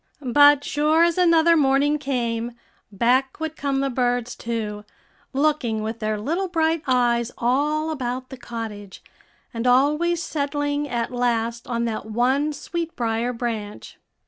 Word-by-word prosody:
But 290 -1 +7
sure 305 +4 +2
as 340 +1 +2
another 335 -1 +5
morning 290 0 +3
came, 240 -4 -2 0.4
back 255 +7 +1
would 320 -1 -4
come 275 -2 -1
the 275 - 0
birds 245 -1 -1
too, 215 -3 -4 0.5
looking 270 -6 0
with 220 +1 -4
their 215 -1 -2
little 335 - -1
bright 325 -2 +1
eyes 240 -2 +2
all 295 +6 0
about 255 -3 -4
the 265 - -9
cottage, 220 -5 -7 0.5
and 230 +1 -2
always 300 +7 +3
settling 290 0 -2
at 235 -1 -2
last 235 0 -1
on 235 -2 -1
that 220 -2 -4
one 260 +7 +1
sweetbrier 245 -8 -3
branch. 225 -4 -5
255 Hz, 135 wpm, -23 LUFS, 235-295 Hz, 0.5 s, But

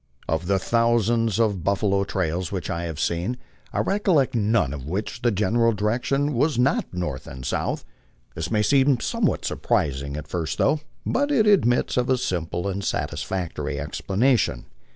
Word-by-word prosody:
Of 80 +2 -1
the 100 0 +3
thousands 115 0 +2
of 105 -6 +1
buffalo 100 0 +1
trails 90 -2 -2
which 95 -3 -3
I 85 +1 -2
have 80 -3 -5
seen, 85 +10 -1 0.3
I - - 0
recollect 190 -9 +2
none 105 - +1
of 70 -2 -7
which 95 +6 -3
the 120 - +3
general 115 +3 +2
direction 120 +8 0
was 145 +4 +1
not 125 +3 +1
north 85 -7 -4
and 65 -2 -8
south. - - -2 0.5
This 80 0 -4
may 105 -1 +2
seem 135 0 +4
somewhat - - 0
surprising 70 0 -1
at 75 -1 -7
first 85 -3 -3
thought, 150 +2 +2 0.2
but 285 +3 +1
it 255 -7 +3
admits 155 - +3
of 125 0 +1
a 130 - +3
simple 90 -6 -2
and 100 0 -3
satisfactory 90 -3 -3
explanation. 120 +6 0
105 Hz, 160 wpm, -24 LUFS, 85-125 Hz, 0.5 s, seem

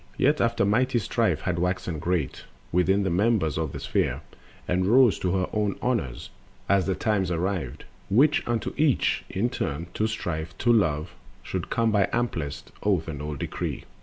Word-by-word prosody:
Yet 145 +3 +3
after 115 -3 +2
mighty 120 +5 +2
Strife 105 -8 0
had 85 -2 -1
waxen 90 -2 -1
great 85 -5 -2 0.3
Within 95 +3 +3
the 95 - 0
members 95 -4 +2
of 80 -3 -2
the - - -6
Sphere, - - -1 0.5
and 90 +1 +1
rose 120 -1 +5
To 90 -1 0
her 95 - 0
own 105 -2 0
honors, 80 - -2 0.4
as 100 -1 +3
the 95 - +1
times 100 -5 0
arrived 90 -6 -2 0.3
Which 140 +9 +4
unto 115 -3 -1
each 150 -3 +2
in 115 +6 -1
turn, 75 - -3
to 110 - 0
Strife, 85 -7 -4
to 120 0 +3
Love, 80 -7 +1 0.3
Should - - -4
come 115 -1 +1
by 100 -2 +3
amplest 80 -12 -2
oath 95 -6 +1
and 75 -3 -5
old 75 -1 -4
decree. - - -4
95 Hz, 170 wpm, -26 LUFS, 80-115 Hz, 0.5 s, rose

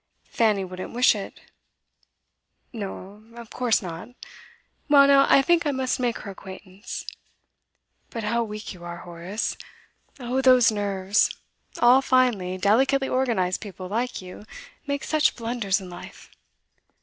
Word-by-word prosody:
'Fanny 210 -4 +1
wouldn't 185 0 -8
wish 250 +1 +5
it.' 205 -2 -8 1.3
'No, 205 -1 -7
of 235 -2 -11
course 240 -4 +1
not, 170 +4 -7 0.8
well 280 -1 +7
now, 275 0 +5
I 275 - +6
think 345 +3 +3
I - - +2
must 260 -1 -1
make 240 -2 0
her 200 - -7
acquaintance. 190 +2 -9 1.0
But 230 - -6
how 235 +3 0
weak 210 -1 -7
you 175 -2 -14
are, 175 0 -7
Horace! 175 +5 -5 0.6
Oh, 250 +1 -1
those 255 -3 +6
nerves! 200 -1 +1 0.5
All 245 +2 +6
finely, 240 -9 +1
delicately 265 +8 +2
organised 230 -9 0
people, 190 -3 -8
like 230 +1 -3
you, 185 +3 -11 0.4
make 280 -1 -2
such 310 -1 +2
blunders 230 -4 -1
in 190 - -10
life. 175 -1 -12
220 Hz, 135 wpm, -24 LUFS, 190-255 Hz, 1.3 s, well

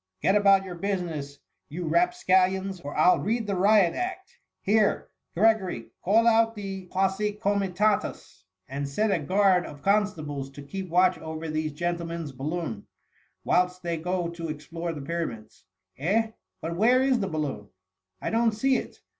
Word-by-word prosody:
" 95 - -54
Get 190 - +4
m 210 - +4
about 195 -1 +5
your 185 - -6
business, 170 -7 -3 0.3
you 170 +4 -5
rapscallions, 190 - +2
or 145 -1 -6
I 155 - +6
'11 - - +3
read 225 +2 0
the 200 -1 -1
riot 195 -1 +4
act! 375 +1 -5 0.2
Here, 210 +1 +1 0.3
Gregory, 190 - +1
call 220 +5 +4
out 225 0 +4
the 195 -3 -6
posse 195 +3 0
cQmitatuSy 200 - 0 0.3
and 140 +1 -4
set 210 +9 +1
a 185 - +2
guard 190 +2 +3
of 145 -1 -11
constables 155 -9 0
to 145 - -9
keep 190 +5 -6
watch 180 +2 +3
over 160 0 -6
these 155 -1 -2
gentlemen's 170 -1 -3
balloon, 135 -4 -4 0.6
whilst 180 0 +1
they 170 -1 -2
go 180 +2 -2
to 170 -1 -6
explore 165 +3 -5
the 150 -4 -7
Pyramids. 125 - -5 0.3
Eh! 220 +9 +1 0.3
but 170 +1 -3
where 245 +7 +4
is 265 -2 +2
the 195 - -1
balloon? 145 -9 -4 0.5
I - - -3
don't 225 0 +2
see 260 +5 +2
it. - - -8
180 Hz, 165 wpm, -26 LUFS, 155-205 Hz, 0.6 s, I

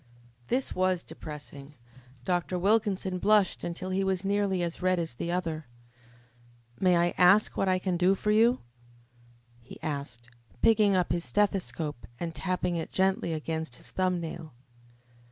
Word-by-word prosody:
This 260 +1 0
was 185 -1 +1
depressing. 145 -1 -10 0.5
Dr. 180 0 0
Wilkinson 195 -1 +1
blushed 210 -1 +3
until 180 +2 -4
he 190 +1 +1
was 190 0 -1
nearly 200 -2 +1
as 170 +1 -4
red 185 0 +2
as 165 -6 -3
the 170 +8 -4
other. 165 -4 -2 1.1
"May 180 -2 +4
I 175 0 +2
ask 195 +4 +5
what 195 - +1
I 185 - +3
can 185 -1 -1
do 185 +2 +3
for 210 +2 -1
you?" 230 +4 +4 1.0
he 115 - -13
asked, 140 -6 -5 0.3
picking 210 -3 +5
up 180 -2 +1
his 170 - 0
stethoscope 175 -9 -1
and 170 -1 -3
tapping 180 0 -1
it 160 - -5
gently 190 -2 +1
against 160 -3 -3
his - - -8
thumb 185 -1 0
nail. 160 -4 -7
180 Hz, 150 wpm, -28 LUFS, 165-195 Hz, 1.1 s, ask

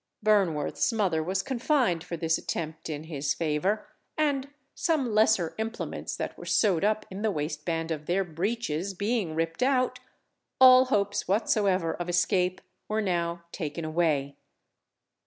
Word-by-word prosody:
Burnworth's 195 -4 +2
mother 190 -8 +1
was 185 +4 -1
confined 250 - +1
for 170 - -5
this 160 0 +1
attempt 160 -1 -5
in 150 -1 -4
his 145 -3 -2
favour, 170 +6 -1 0.3
and 285 -3 +1 0.3
some 280 -9 0
lesser 215 -6 +3
implements 225 +1 -4
that - - -4
were - - -9
sewed 190 -6 +2
up 215 +1 +1
in 190 +2 -6
the 220 - +1
waistband 165 0 -3
of 155 -1 -4
their 190 +3 +2
breeches 185 0 -2
being 200 -4 -1
ripped 165 +4 -2
out, 255 -1 +2 0.6
all 255 0 +9
hopes 205 -5 0
whatsoever 195 -4 +1
of 175 0 -5
escape 180 +1 +1 0.3
were 215 +1 -1
now 170 -2 -1
taken 160 -1 -4
away. 155 -4 0
185 Hz, 140 wpm, -28 LUFS, 160-215 Hz, 0.6 s, all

